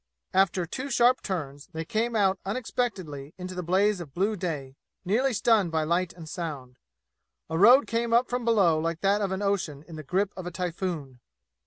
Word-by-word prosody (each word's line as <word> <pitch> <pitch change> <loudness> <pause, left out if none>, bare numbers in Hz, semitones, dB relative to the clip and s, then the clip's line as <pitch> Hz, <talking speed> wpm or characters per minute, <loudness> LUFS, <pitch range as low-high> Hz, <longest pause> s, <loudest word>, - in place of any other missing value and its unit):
After 190 -2 +3
two 260 +11 -5
sharp 245 0 +4
turns 145 -7 -5
they 160 0 -4
came 225 +6 -1
out 195 -3 +2
unexpectedly 195 - -3
into 185 0 -6
the 180 - -4
blaze 190 +3 +2
of 145 -6 -10
blue 200 +4 +1
day, 150 -8 -4 0.3
nearly 245 +9 +2
stunned 220 -6 +2
by 160 -1 +1
light 170 +3 0
and 165 -2 -11
sound. 145 -7 -6 0.7
A 160 - 0
road 245 +8 +7
came 230 0 -1
up 235 +2 +4
from 245 0 -2
below 195 -9 +3
like 165 +1 -2
that 200 +1 +2
of 195 -2 -1
an 190 +2 -2
ocean 175 -8 -1
in 165 -2 -9
the 155 - -7
grip 190 +6 0
of 185 -2 -6
a - - -4
typhoon. 170 -7 -4
185 Hz, 190 wpm, -27 LUFS, 160-210 Hz, 0.7 s, road